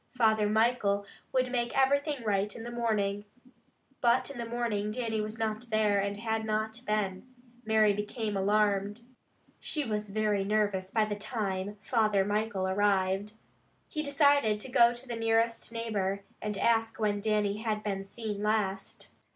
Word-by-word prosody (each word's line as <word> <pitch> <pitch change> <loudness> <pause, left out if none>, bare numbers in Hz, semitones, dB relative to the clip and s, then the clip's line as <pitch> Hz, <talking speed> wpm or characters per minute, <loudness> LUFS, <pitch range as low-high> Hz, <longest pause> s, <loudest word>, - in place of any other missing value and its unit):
Father 220 -3 +3
Michael 215 -2 +2 0.3
would 255 -1 +1
make 240 -1 -1
everything 280 0 +2
right 205 -1 0
in 225 - -7
the 240 - -6
morning. 210 -4 0 0.8
But 240 +3 +3
in 260 - -8
the 235 - -3
morning 230 -3 -1
Dannie 225 -1 -2
was 215 +1 -5
not 220 +1 -3
there, 215 -2 +2
and 200 0 -1
had 220 0 -2
not 220 +1 -2
been. 210 0 -1 0.4
Mary 215 -1 +4
became 210 +1 -3
alarmed. 205 +1 +1 0.6
She 300 -2 -2
was 210 -2 -2
very 210 -1 +1
nervous 205 -2 0
by 220 +1 +2
the 210 -1 -3
time 205 -2 -3
Father 215 -4 +2
Michael 205 -2 -1
arrived. 195 +1 +1 0.6
He 305 - -2
decided 285 -7 +3
to 260 - -5
go 235 0 +6
to 240 +2 -9
the 240 - -4
nearest 225 0 +1
neighbor, 200 -4 -2 0.2
and 210 -1 -3
ask 225 -1 +1
when 205 -2 0
Dannie 210 -1 +1
had 215 -1 -2
been 195 -2 -2
seen 210 0 -5
last. 205 -2 -1
215 Hz, 155 wpm, -30 LUFS, 205-230 Hz, 0.8 s, go